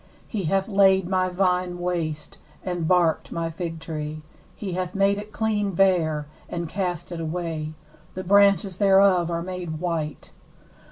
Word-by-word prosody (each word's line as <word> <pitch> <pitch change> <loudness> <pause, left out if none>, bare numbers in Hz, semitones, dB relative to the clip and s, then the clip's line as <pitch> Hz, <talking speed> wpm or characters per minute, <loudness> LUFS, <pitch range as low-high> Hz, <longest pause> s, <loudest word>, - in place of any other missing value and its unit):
7He 195 -7 -1
hath 195 +3 +1
laid 195 -3 +4
my 185 0 +1
vine 180 -1 0
waste, 165 -4 -3 0.2
and 175 -3 -2
barked 175 -3 +2
my 165 -1 -2
fig 165 -1 -5
tree: 155 -1 -5 0.3
he 195 -4 -5
hath 180 +1 -3
made 200 +1 +3
it 210 +1 -9
clean 210 -3 0
bare, 165 -5 +2 0.2
and 170 -1 -3
cast 180 -1 -3
it 170 - -4
away; 160 -1 -3 0.4
the 185 - -4
branches 195 -1 +4
thereof 195 -3 +5
are 170 0 -2
made 175 -3 -5
white. 165 -4 -3
180 Hz, 150 wpm, -24 LUFS, 165-195 Hz, 0.4 s, thereof